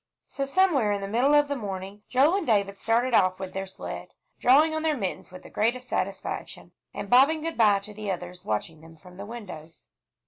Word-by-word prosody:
So 275 - -3
somewhere 280 - +2
in 200 - -2
the 195 - -4
middle 250 +8 +3
of 290 0 +4
the 285 - -2
morning, 195 -3 -6
Joel 285 +9 +4
and 390 - -4
David 200 -3 +1
started 235 +2 +1
off 185 -3 +4
with 190 -1 -6
their 195 0 -4
sled, 190 - -8 0.2
drawing 300 +5 +5
on 315 - -2
their 310 -2 0
mittens 195 -6 -4
with 185 0 -12
the - - -13
greatest 245 +4 0
satisfaction, - - -4 0.2
and - - -6
bobbing 275 +8 +5
good 330 0 -3
by 210 -3 +5
to 210 +1 -9
the 210 -1 -6
others 180 -1 -5
watching 150 +9 -3
them 165 0 -15
from 180 +2 -16
the 200 +1 -8
windows. 180 -9 -10
210 Hz, 210 wpm, -26 LUFS, 190-275 Hz, 0.2 s, drawing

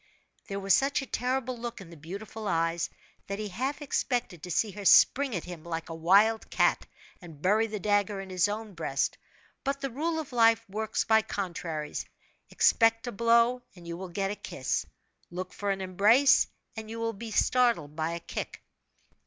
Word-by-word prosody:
There 200 0 -4
was 195 -1 +2
such 275 +1 +2
a - - -6
terrible 255 0 -1
look 240 0 -6
in 180 -3 -11
the - - -10
beautiful 200 +7 -7
eyes, 165 -1 0 0.4
that 200 - -3
he 210 0 -4
half 265 +9 -3
expected 245 - -1
to 180 - -8
see 205 +5 +1
her 205 +1 -8
spring 265 +5 +5
at 175 - -3
him 175 -3 -9
like 165 0 -5
a - - -5
wild 200 +7 +3
cat, - - +2 0.3
and 165 -5 -12
bury 210 +7 +2
the 210 -1 -5
dagger 205 0 +1
in 190 -1 -8
his 185 +1 +2
own 210 0 -5
breast. 155 -5 -2 0.4
But 275 0 -1
the 275 -1 -3
rule 320 +6 -1
of 305 -5 -5
life 230 -1 +4
works 215 +2 -2
by 220 0 +4
contraries: 170 -7 -4 0.5
expect 225 0 +3
a 245 - -3
blow 235 +3 +3
and 175 -2 -13
you 170 - -4
will 185 +1 -7
get 195 +3 -2
a - - -3
kiss, 130 -9 -3 0.4
look 185 +1 -6
for 205 - -3
an 195 -1 -1
embrace, 210 +9 +4 0.3
and 220 -1 -7
you 230 +1 -6
will 230 0 -1
be 225 +2 -7
startled 220 - +2
by 160 +1 -1
a 170 - -4
kick. - - -6
205 Hz, 190 wpm, -29 LUFS, 175-230 Hz, 0.5 s, spring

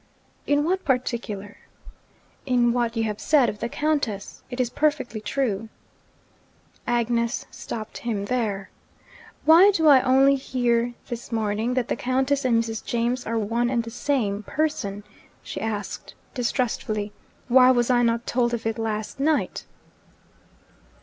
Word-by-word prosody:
'In 290 0 +3
what 370 +4 0
particular?' 235 -6 -2 0.9
'In 240 -2 +3
what 240 -1 -1
you 225 - +1
have 210 -2 -3
said 285 -6 +4
of 210 - -6
the 235 - -3
Countess. 280 -11 -2
It 245 0 -6
is 245 -2 0
perfectly 250 -8 0
true 225 -4 -2 0.6
' - - -35
Agnes 235 0 0
stopped 220 -1 -7
him 215 -4 -2
there. 205 -5 -2 0.7
'Why 335 +6 +8
do 335 -6 +1
I 280 -4 +8
only 270 +2 +5
hear 240 -2 0
this 240 -2 -7
morning 220 +2 -1
that 250 -2 0
the - - -1
Countess 265 +3 0
and 230 -2 +3
Mrs. 225 -1 -5
James 240 +2 -1
are 230 +1 -1
one 230 +3 0
and 240 -2 0
the 230 - -8
same 225 -6 -1
person?' 240 -7 -2 0.4
she - - -6
asked 210 -3 -4 0.2
distrustfully. 225 -4 -1 0.4
'Why 255 +1 +6
was 245 -1 +3
I 245 -1 +4
not 235 0 +1
told 240 -1 +1
of 225 - -7
it 225 0 -1
last 220 +2 -3
night?' 300 +2 0
240 Hz, 145 wpm, -24 LUFS, 220-260 Hz, 0.9 s, Why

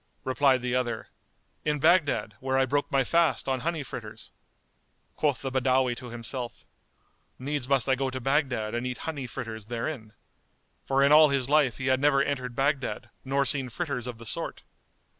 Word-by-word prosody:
Replied 130 -1 +2
the 125 -1 -1
other, 120 -3 -1 0.5
"In 150 -1 0
Baghdad 155 - +3
where 130 0 0
I 135 - +4
broke 145 +2 -1
my 135 -1 +3
fast 165 +2 +2
on 130 -1 0
honey 165 +1 -2
fritters."[FN#207] 115 -4 -13
Quoth 145 -4 0
the 135 - -2
Badawi 130 -1 +2
to 125 -2 -8
himself, 120 +1 -5 0.7
"Needs 140 -1 -3
must 135 -3 +2
I 135 - +4
go 135 +1 0
to 130 0 -4
Baghdad 130 -5 0
and 120 +2 -2
eat 125 - -4
honey 145 -5 -4
fritters 110 -4 -7
therein"; 115 -1 -4 0.7
for 135 0 +2
in 140 - +5
all 155 0 +8
his 135 -2 +1
life 145 -5 +3
he 130 - -4
had 130 0 +3
never 140 -1 +4
entered 125 -4 -3
Baghdad 135 0 -1
nor 140 +1 +1
seen 135 -2 -1
fritters 135 -2 -3
of 120 -2 -6
the 115 - -11
sort. - - -4
130 Hz, 180 wpm, -27 LUFS, 125-140 Hz, 0.7 s, all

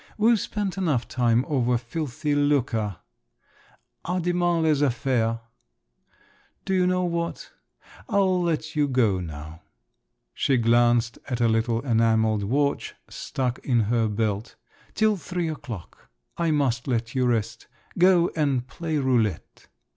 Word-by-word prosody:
"We've 225 +1 +4
spent 200 -2 -3
enough 150 -10 0
time 120 0 +1
over 125 -4 +1
filthy 145 +4 -3
lucre… 130 -9 +1 1.1
à 180 +1 -1
demain 175 -1 +1
les 155 -3 +2
affaires. 120 -4 +1 1.3
Do 190 - -1
you 180 -1 +3
know 180 0 +1
what, 170 -1 -3 0.6
I'll 190 -4 +2
let 160 -2 -2
you 150 -1 +2
go 115 -8 +2
now… 80 -1 -8 0.7
(she 135 - +1
glanced 120 0 +3
at 125 -2 -2
a 120 - +3
little 115 +1 +1
enamelled 110 -3 +2
watch, 140 +8 -1 0.2
stuck 125 -2 -3
in 120 -3 +1
her 115 +1 +1
belt)… 105 +1 -2 0.4
till 215 -1 +2
three 170 +1 -3
o'clock… 115 - -8 0.3
I 170 -1 0
must 135 -6 0
let 115 -3 -1
you 130 -1 +1
rest. 115 -1 -2 0.3
Go 180 -1 +4
and 140 -5 0
play 160 +3 -3
roulette." 120 - -1
130 Hz, 130 wpm, -25 LUFS, 115-165 Hz, 1.3 s, We've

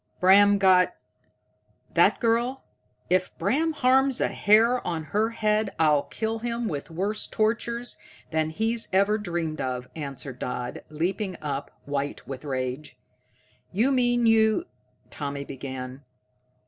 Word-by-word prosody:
"Bram 200 +2 +6
got 185 -2 +4 1.0
that - - +4
girl? 240 +3 +1 0.4
If 185 0 0
Bram 320 +4 +1
harms 265 -1 +3
a - - +1
hair 225 +4 +4
of 170 -7 -3
her 215 +2 +1
head 215 -2 0
I'll 150 -3 +4
kill 225 0 -3
him 235 0 -2
with 145 -7 -4
worse 195 +6 -2
tortures 235 +2 -1 0.3
than 160 -1 0
he's 225 +7 0
ever 200 +3 +3
dreamed 170 -5 -3
of," 125 -1 -3
answered 140 -4 -6
Dodd, 125 0 -4
leaping 180 +4 -2
up, 140 -2 -4 0.2
white 145 0 -3
with 135 0 -7
rage. 130 +1 -4 0.7
"You 230 +8 +2
mean 245 -2 +2
you 220 +7 +4 0.2
?" - - -38
Tommy 140 -1 -5
began. 130 0 -7
195 Hz, 130 wpm, -26 LUFS, 145-225 Hz, 1.0 s, Bram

